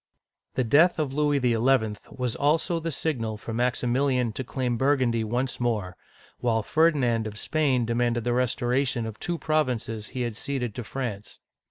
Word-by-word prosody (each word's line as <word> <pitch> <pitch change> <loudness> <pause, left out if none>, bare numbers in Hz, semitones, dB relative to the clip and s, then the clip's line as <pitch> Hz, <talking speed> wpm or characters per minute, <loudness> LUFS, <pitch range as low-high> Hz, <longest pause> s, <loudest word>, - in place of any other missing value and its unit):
The 130 - +2
death 155 +11 +5
of 150 -4 -1
Louis 145 0 +2
XL 125 +1 +3 0.3
was 125 -2 -3
also 160 +4 +1
the 165 0 -3
signal 115 -8 -2
for 115 +1 -7
MaximiL 125 +3 +1
ian 125 -3 +1
to 130 - -4
claim 125 -1 -2
Burgundy 130 -3 +2
once 125 +4 -2
more, 105 -7 -1 0.4
while 115 -2 +1
Fer'dinandof 120 -9 +2
Spain 135 -3 +1
demanded 120 0 0
the 120 +1 0
restoration 125 0 0
of 110 -1 -7
two 175 -1 -2
provinces 125 -9 -1
which - - -17
he 130 - -1
had 120 -3 -3
ceded 125 -3 -3
to 120 - -5
France. 105 -4 -5
125 Hz, 165 wpm, -26 LUFS, 115-140 Hz, 0.4 s, death